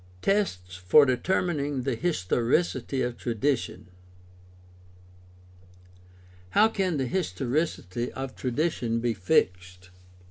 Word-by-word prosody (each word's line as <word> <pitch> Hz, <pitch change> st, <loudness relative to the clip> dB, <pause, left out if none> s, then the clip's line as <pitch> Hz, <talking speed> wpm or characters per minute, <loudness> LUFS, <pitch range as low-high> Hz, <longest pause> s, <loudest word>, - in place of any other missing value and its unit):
Tests 90 Hz, -, 0 dB
for 90 Hz, +11 st, +6 dB
determining 145 Hz, 0 st, 0 dB
the 135 Hz, 0 st, -1 dB
historicity 130 Hz, -, 0 dB
of 120 Hz, -1 st, -3 dB
tradition. 115 Hz, -4 st, -2 dB, 0.9 s
— 90 Hz, 0 st, -25 dB
How 220 Hz, +2 st, +6 dB
can 190 Hz, -7 st, -1 dB
the 135 Hz, -, 0 dB
historicity 130 Hz, -, -2 dB
of 135 Hz, -1 st, -6 dB
tradition 125 Hz, -3 st, -1 dB
be 120 Hz, 0 st, 0 dB
fixed? 90 Hz, -1 st, 0 dB
120 Hz, 95 wpm, -27 LUFS, 90-145 Hz, 0.9 s, for